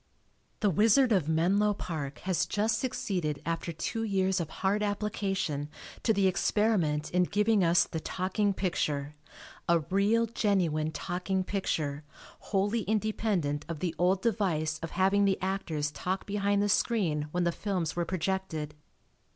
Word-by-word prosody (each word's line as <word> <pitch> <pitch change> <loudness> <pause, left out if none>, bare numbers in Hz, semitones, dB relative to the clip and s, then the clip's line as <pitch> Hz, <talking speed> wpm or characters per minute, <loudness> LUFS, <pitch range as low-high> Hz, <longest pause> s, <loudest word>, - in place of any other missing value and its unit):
The 205 -3 +3
Wizard 225 - +4
of 180 -8 +2
Menlo 195 +6 +2
Park 150 -7 -5
has 185 -2 0
just 215 +1 +1
succeeded 180 - -2
after 165 +1 -2
two 170 +7 -3
years 190 -3 +1
of 165 -3 -3
hard 200 +4 0
application 195 -8 -2 0.3
to 225 - +2
the 200 -2 +2
experiment 185 -5 +1
in 180 - +3
giving 205 +2 +2
us 170 +1 +5
the 160 - -4
talking 190 +5 -1
picture, 150 -7 -1 0.6
a 170 -1 +4
real 210 +4 +3
genuine 180 -9 0
talking 185 +3 -2
picture, 155 -7 -2 0.5
wholly 205 +3 +1
independent 210 -8 0
of 165 - -3
the 170 +1 -2
old 185 +2 +2
device 165 -8 0
of 165 - -4
having 195 +3 +3
the 195 -1 +2
actors 175 -6 -2
talk 185 +5 -3
behind 200 0 +1
the - - +2
screen 170 -10 +1
when 175 +3 -1
the 170 - +2
films 180 -4 -2
were 175 - 0
projected. 175 -3 -2
190 Hz, 145 wpm, -29 LUFS, 160-205 Hz, 0.6 s, us